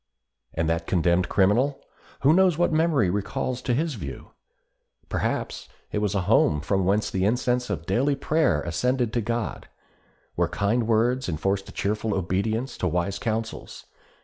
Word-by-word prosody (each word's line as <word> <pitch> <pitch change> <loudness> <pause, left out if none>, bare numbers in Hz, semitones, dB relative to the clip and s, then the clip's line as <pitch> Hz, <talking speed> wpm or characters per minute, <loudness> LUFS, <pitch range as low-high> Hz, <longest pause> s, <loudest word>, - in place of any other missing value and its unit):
And 80 0 0
that 85 0 -1
condemned 85 0 +2
criminal—who 135 +7 +1
knows 185 -2 +4
what 175 -1 +2
memory 155 - +2
recalls 125 +6 -2
to 125 - 0
his 155 +3 0
view? 70 - -8 0.8
Perhaps - - -2 0.2
it - - -1
was 105 -1 -1
a 100 - +2
home 90 -6 +3
from 95 +5 0
whence 100 +3 +1
the 95 - -1
incense 125 +3 +1
of 85 -5 -3
daily 130 +10 +1
prayer 140 - +1
ascended 120 - 0
to 120 - +1
God—where 115 +1 -5
kind 110 +3 0
words 120 +1 +1
enforced 95 +5 -1
a - - -8
cheerful 105 +1 -1
obedience 110 +7 -1
to 90 - 0
wise 90 +3 -1
counsels. 110 0 -4
110 Hz, 150 wpm, -25 LUFS, 95-125 Hz, 0.8 s, knows